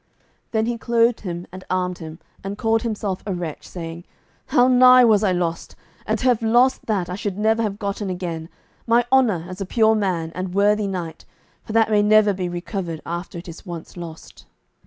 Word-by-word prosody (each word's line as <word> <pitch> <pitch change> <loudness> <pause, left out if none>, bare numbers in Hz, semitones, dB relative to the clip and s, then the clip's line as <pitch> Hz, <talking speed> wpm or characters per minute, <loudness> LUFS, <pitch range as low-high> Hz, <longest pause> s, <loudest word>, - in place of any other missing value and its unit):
Then 220 -1 0
he 235 0 -2
clothed 235 0 +2
him 175 -3 -5
and 185 +1 -9
armed 180 -1 -1
him, 160 -1 -8 0.3
and 195 +1 -5
called 225 +1 +1
himself 210 -4 -3
a 195 - -1
wretch, 170 -4 -6
saying, 170 -1 -7 0.4
"How 245 0 +4
nigh 255 0 +7
was 215 -2 +4
I 195 - +3
lost, 170 -2 -2 0.3
and 215 +1 +1
to 235 - -5
have 245 -3 +3
lost 240 +3 +3
that 200 -6 0
I 180 - -5
should 200 0 -4
never 220 +2 +2
have 205 -3 -2
gotten 200 -1 -3
again, 170 -3 -4 0.4
my 235 +1 +4
honour 225 -11 +3
as 185 +2 -8
a - - -2
pure 220 +1 +3
man 180 -6 -1
and 185 0 -5
worthy 205 +1 +3
knight, 175 -4 -5 0.4
for 215 - -8
that 225 -1 +3
may 210 -1 +4
never 210 0 +5
be 180 -2 -3
recovered 175 -2 -5
after 170 +1 -5
it 170 - -9
is 170 0 -10
once 170 -4 -8
lost." 170 -2 -10
200 Hz, 200 wpm, -22 LUFS, 175-220 Hz, 0.4 s, nigh